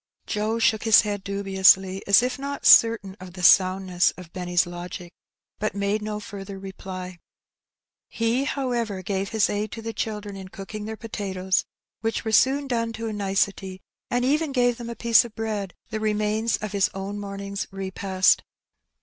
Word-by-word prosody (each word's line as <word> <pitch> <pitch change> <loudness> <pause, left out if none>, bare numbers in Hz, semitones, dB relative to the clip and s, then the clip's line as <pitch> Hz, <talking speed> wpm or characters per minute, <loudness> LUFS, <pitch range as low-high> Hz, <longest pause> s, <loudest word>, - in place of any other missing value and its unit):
Joe 215 +1 -1
shook 220 -1 +2
his 225 -2 +6
head 205 -2 -4
dubiously 190 -1 +3
as 200 +4 +6
if 255 +2 -2
not 280 +1 -5
certain 225 -4 +6
of 185 -1 -10
the 185 -1 -8
sound 185 +1 +5
ness 180 -1 +3
of 180 -2 -12
Benny's 180 0 +1
logic, 175 0 -8 0.5
but 215 -1 -2
made 200 +1 0
no 210 0 -4
further 200 -1 -8
reply. 185 -2 -8 0.9
He, 235 +4 0
however, 235 -9 -2
gave 195 +1 -2
his 220 -2 +2
aid 205 0 -2
to 225 - -6
the 225 0 -4
children 210 -3 -4
in 190 -1 -8
cooking 205 +3 -8
their 220 0 -6
potatoes, 190 -4 -2 0.3
which 225 0 -2
were 220 - -1
soon 270 +6 +4
done 230 -3 -1
to 225 0 -4
a - - -4
nicety, 195 -1 -1 0.3
and 245 0 0
even 300 +3 +1
gave 245 -2 +1
them 235 -1 -6
a 235 - -5
piece 235 -1 +5
of 235 -2 -11
bread, 210 -4 -3 0.2
the 220 - -2
remains 215 +1 0
of 215 -2 -5
his 200 -2 +2
own 195 +2 -5
morning's 200 0 -5
repast. 190 -1 +1
205 Hz, 175 wpm, -24 LUFS, 190-225 Hz, 0.9 s, his